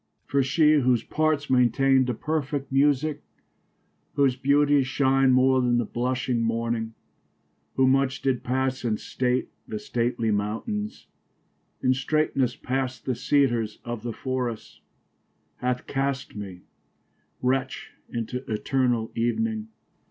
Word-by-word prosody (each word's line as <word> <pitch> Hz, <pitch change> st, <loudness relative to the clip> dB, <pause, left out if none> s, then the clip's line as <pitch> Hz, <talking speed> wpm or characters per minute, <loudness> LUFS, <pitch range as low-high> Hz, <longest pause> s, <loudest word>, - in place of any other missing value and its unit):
For 140 Hz, -, +1 dB
she, 150 Hz, +3 st, +4 dB
whose 125 Hz, -3 st, +2 dB
parts 155 Hz, -2 st, 0 dB
maintainde 130 Hz, +1 st, +3 dB
a 120 Hz, -, -1 dB
perfect 145 Hz, -1 st, -3 dB
musique, 145 Hz, +2 st, +2 dB, 0.9 s
Whose 135 Hz, -3 st, +3 dB
beautie 140 Hz, +1 st, +3 dB
shin'de 135 Hz, 0 st, +2 dB
more 130 Hz, +1 st, +4 dB
then 120 Hz, -1 st, +2 dB
the 120 Hz, -, +1 dB
blushing 125 Hz, +1 st, -1 dB
morning, 115 Hz, 0 st, -1 dB, 0.8 s
Who 130 Hz, 0 st, +4 dB
much 135 Hz, 0 st, +1 dB
did 130 Hz, -3 st, 0 dB
passe 130 Hz, +1 st, -1 dB
in 110 Hz, -3 st, 0 dB
state 125 Hz, 0 st, -1 dB, 0.2 s
the 110 Hz, -, -4 dB
stately 115 Hz, 0 st, -1 dB
mountaines. 115 Hz, -, -3 dB, 0.8 s
In 130 Hz, -, +4 dB
straightnes 135 Hz, -2 st, 0 dB
past 130 Hz, -1 st, -3 dB
the 130 Hz, -, 0 dB
Cedars 120 Hz, -5 st, +1 dB
of 120 Hz, -2 st, -4 dB
the 120 Hz, +1 st, -4 dB
forrests, 125 Hz, -2 st, -4 dB, 0.8 s
Hath 125 Hz, 0 st, -2 dB
cast 135 Hz, -1 st, -2 dB
me 95 Hz, -4 st, -7 dB, 0.8 s
wretch 130 Hz, +1 st, -1 dB, 0.2 s
into 120 Hz, +2 st, -4 dB
eternall 120 Hz, 0 st, 0 dB
evening. 220 Hz, -, -1 dB
130 Hz, 120 wpm, -25 LUFS, 120-135 Hz, 0.9 s, she